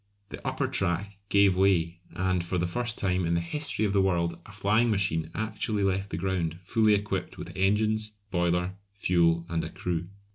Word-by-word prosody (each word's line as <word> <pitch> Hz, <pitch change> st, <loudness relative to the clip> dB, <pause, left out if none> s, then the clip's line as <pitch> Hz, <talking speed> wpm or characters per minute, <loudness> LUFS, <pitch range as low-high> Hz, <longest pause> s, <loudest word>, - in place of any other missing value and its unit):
The -, -, -9 dB
upper -, -, 0 dB
track 95 Hz, +3 st, -1 dB
gave 100 Hz, -2 st, +5 dB
way, 90 Hz, -3 st, +2 dB, 0.2 s
and 95 Hz, -1 st, 0 dB
for 90 Hz, +2 st, -2 dB
the 90 Hz, -, +1 dB
first 120 Hz, +6 st, -1 dB
time 95 Hz, -2 st, 0 dB
in 85 Hz, 0 st, +1 dB
the -, -, +2 dB
history 140 Hz, -, +1 dB
of 100 Hz, -, 0 dB
the 100 Hz, -, +4 dB
world 85 Hz, -3 st, 0 dB
a -, -, -11 dB
flying 105 Hz, +4 st, +2 dB
machine 95 Hz, -6 st, 0 dB
actually 110 Hz, -1 st, -1 dB
left 95 Hz, +1 st, 0 dB
the -, -, -3 dB
ground 85 Hz, -4 st, -1 dB
fully 110 Hz, +3 st, +3 dB
equipped 100 Hz, -2 st, -3 dB
with -, -, -8 dB
engines, 110 Hz, +3 st, +1 dB, 0.2 s
boiler, 90 Hz, +1 st, 0 dB, 0.2 s
fuel, 85 Hz, -4 st, +2 dB
and 85 Hz, -1 st, -1 dB
a -, -, -4 dB
crew. 85 Hz, -1 st, -3 dB
95 Hz, 185 wpm, -28 LUFS, 85-105 Hz, 0.2 s, gave